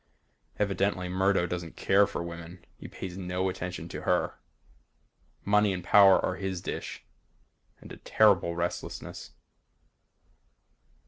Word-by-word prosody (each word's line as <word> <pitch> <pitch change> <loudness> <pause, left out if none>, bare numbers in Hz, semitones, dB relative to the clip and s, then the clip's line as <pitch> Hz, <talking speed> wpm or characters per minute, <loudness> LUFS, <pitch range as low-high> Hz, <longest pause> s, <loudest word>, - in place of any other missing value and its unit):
Evidently 100 -2 0
Murdo 95 0 +2
doesn't 85 -2 -5
care 100 +1 +4
for 100 -4 -4
women. 85 +1 -9
He - - -9
pays 90 -2 -7
no 90 +1 -1
attention 90 -1 -5
to - - -6
her. - - 0 1.1
Money 105 0 +3
and 90 -1 -5
power 100 -2 +7
are 90 - -2
his 95 -1 -3
dish. 90 - -6 0.8
And - - -12
a - - -9
terrible 95 -5 +3
restlessness. 85 +1 -5
95 Hz, 120 wpm, -28 LUFS, 90-100 Hz, 1.1 s, power